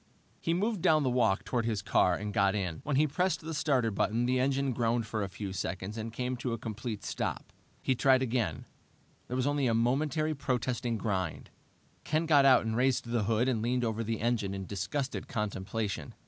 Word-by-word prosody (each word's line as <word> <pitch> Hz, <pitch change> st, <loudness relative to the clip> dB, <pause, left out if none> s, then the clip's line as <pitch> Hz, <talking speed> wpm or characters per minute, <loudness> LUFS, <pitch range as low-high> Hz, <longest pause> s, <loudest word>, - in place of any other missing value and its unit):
He 165 Hz, -, 0 dB
moved 205 Hz, +1 st, 0 dB
down 155 Hz, -4 st, +4 dB
the 130 Hz, -, +1 dB
walk 115 Hz, -6 st, +2 dB
toward 120 Hz, -2 st, -1 dB
his 110 Hz, -4 st, -1 dB
car 90 Hz, -3 st, +3 dB
and 105 Hz, +2 st, -4 dB
got 100 Hz, +1 st, +3 dB
in. 90 Hz, -6 st, -3 dB
When 145 Hz, -, -1 dB
he 150 Hz, +3 st, +4 dB
pressed 155 Hz, +2 st, 0 dB
die 160 Hz, -, -6 dB
starter 135 Hz, -7 st, +1 dB
button 115 Hz, +4 st, 0 dB
the 130 Hz, +1 st, +2 dB
engine 135 Hz, 0 st, +1 dB
groaned 115 Hz, -1 st, +1 dB
for 110 Hz, 0 st, -3 dB
a 100 Hz, -, -2 dB
few 95 Hz, +1 st, -6 dB
seconds 95 Hz, +2 st, -4 dB
and 115 Hz, 0 st, -4 dB
came 125 Hz, +2 st, -2 dB
to 120 Hz, -1 st, -2 dB
a -, -, -2 dB
complete 110 Hz, -2 st, -5 dB
stop. -, -, -4 dB, 0.3 s
He 130 Hz, -, +2 dB
tried 130 Hz, +1 st, +4 dB
again; 115 Hz, -, -1 dB, 0.6 s
there 125 Hz, -, -4 dB
was 130 Hz, -, +1 dB
only 145 Hz, -2 st, +1 dB
a 115 Hz, -, +2 dB
momentary, 150 Hz, +6 st, +1 dB
protesting 125 Hz, -4 st, -1 dB
grind. 100 Hz, -4 st, -3 dB, 0.5 s
Ken 155 Hz, +2 st, 0 dB
got 145 Hz, -4 st, +5 dB
out 130 Hz, -4 st, +6 dB
and 110 Hz, 0 st, -1 dB
raised 125 Hz, +1 st, +2 dB
the 115 Hz, -3 st, 0 dB
hood 115 Hz, +3 st, +2 dB
and 120 Hz, -4 st, +1 dB
leaned 125 Hz, +2 st, 0 dB
over 115 Hz, 0 st, -1 dB
the 115 Hz, 0 st, -3 dB
engine 110 Hz, -4 st, 0 dB
in 95 Hz, -1 st, -5 dB
disgusted 130 Hz, +9 st, -3 dB
contemplation. 100 Hz, -, -3 dB
120 Hz, 205 wpm, -30 LUFS, 105-135 Hz, 0.6 s, out